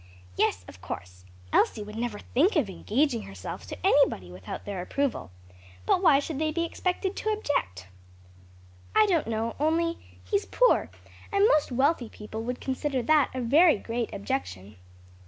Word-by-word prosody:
"Yes, 90 Hz, 0 st, +1 dB
of 90 Hz, -, -13 dB
course; 90 Hz, +1 st, -8 dB, 0.3 s
Elsie 210 Hz, -, +2 dB
would 210 Hz, +1 st, -9 dB
never 230 Hz, -2 st, -3 dB
think 325 Hz, -, +1 dB
of 255 Hz, -, +1 dB
engaging 240 Hz, +5 st, 0 dB
herself 95 Hz, -2 st, -8 dB
to -, -, -7 dB
anybody 90 Hz, -1 st, +3 dB
without 90 Hz, +1 st, -8 dB
their 200 Hz, -3 st, -4 dB
approval. 240 Hz, -, -2 dB, 0.6 s
But -, -, +3 dB
why 320 Hz, -7 st, +6 dB
should 285 Hz, 0 st, -3 dB
they 310 Hz, 0 st, 0 dB
be 335 Hz, +2 st, -1 dB
expected 365 Hz, +3 st, -2 dB
to 435 Hz, -, -2 dB
object?" 105 Hz, -, -1 dB, 1.1 s
"I 435 Hz, 0 st, +6 dB
don't 345 Hz, -, +1 dB
know, 225 Hz, 0 st, -2 dB
only 335 Hz, +2 st, +1 dB, 0.2 s
he's 405 Hz, -1 st, -1 dB
poor, -, -, +3 dB, 0.4 s
and 400 Hz, +1 st, +4 dB
most 305 Hz, -, +2 dB
wealthy 265 Hz, -1 st, +1 dB
people 215 Hz, +1 st, -7 dB
would 250 Hz, +1 st, -3 dB
consider 265 Hz, -1 st, -2 dB
that 300 Hz, +2 st, +4 dB
a 255 Hz, -, -2 dB
very 300 Hz, +5 st, +5 dB
great 230 Hz, +2 st, -3 dB
objection." 95 Hz, +1 st, -4 dB
255 Hz, 155 wpm, -27 LUFS, 200-320 Hz, 1.1 s, why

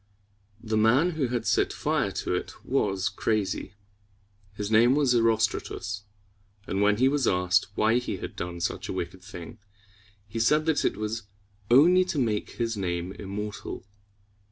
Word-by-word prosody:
The 110 Hz, -1 st, -1 dB
man 125 Hz, +11 st, +4 dB
who 155 Hz, -6 st, -1 dB
had 120 Hz, -1 st, -2 dB
set -, -, +2 dB
fire -, -, 0 dB
to -, -, -3 dB
it -, -, -5 dB
was 95 Hz, 0 st, 0 dB
crazy. 105 Hz, -2 st, -2 dB, 0.8 s
His 105 Hz, +1 st, -4 dB
name 120 Hz, +4 st, +5 dB
was 140 Hz, -4 st, +3 dB
E 120 Hz, -, +4 dB
ros´tra 110 Hz, -1 st, +2 dB
tus; 105 Hz, 0 st, -6 dB, 0.6 s
and 95 Hz, -, -2 dB
when 105 Hz, 0 st, +4 dB
he 130 Hz, +3 st, +4 dB
was 140 Hz, 0 st, +1 dB
asked 90 Hz, +2 st, +2 dB
why 110 Hz, +3 st, +3 dB
he 125 Hz, -, -4 dB
had -, -, -7 dB
done 85 Hz, 0 st, -5 dB
such -, -, -3 dB
a -, -, -2 dB
wicked 95 Hz, 0 st, -5 dB
thing, 90 Hz, +4 st, -10 dB, 0.7 s
he 115 Hz, +3 st, -5 dB
said 150 Hz, +7 st, +3 dB
that 160 Hz, -2 st, +1 dB
it -, -, 0 dB
was 110 Hz, 0 st, -4 dB, 0.4 s
only 170 Hz, +9 st, +6 dB
to 180 Hz, -, -3 dB
make 110 Hz, -6 st, -1 dB
his 115 Hz, -1 st, -2 dB
name 90 Hz, -2 st, -2 dB
immortal. 105 Hz, 0 st, -6 dB
110 Hz, 165 wpm, -27 LUFS, 100-125 Hz, 0.8 s, only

